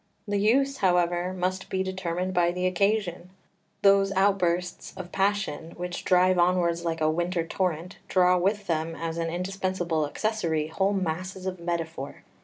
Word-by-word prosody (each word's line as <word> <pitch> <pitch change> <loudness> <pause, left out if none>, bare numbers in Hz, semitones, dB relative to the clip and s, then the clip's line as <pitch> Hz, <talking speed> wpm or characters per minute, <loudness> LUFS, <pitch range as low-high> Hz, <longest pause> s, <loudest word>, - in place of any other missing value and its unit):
The 205 0 0
use, 270 +7 +3
however, 180 -1 +2
must 185 0 -2
be 190 0 0
determined 185 -1 -3
by 175 -1 +3
the 180 +1 -2
occasion. 185 -1 0 0.5
Those 195 0 +5
outbursts 180 -2 0
of 180 -1 -7
passion 195 -5 -1
which 175 0 -4
drive 185 0 +4
onwards 175 -1 +2
like 165 -1 -2
a 155 0 +3
winter 175 +1 -1
torrent 175 0 -2
draw 180 -1 +4
with 200 +3 0
them 165 -2 -1
as 165 0 -4
an 165 0 -1
indispensable 180 -3 -1
accessory 165 -5 -1
whole 190 +5 +1
masses 185 +1 -3
of 185 -1 -3
metaphor. 165 -5 -4
180 Hz, 150 wpm, -27 LUFS, 170-190 Hz, 0.5 s, Those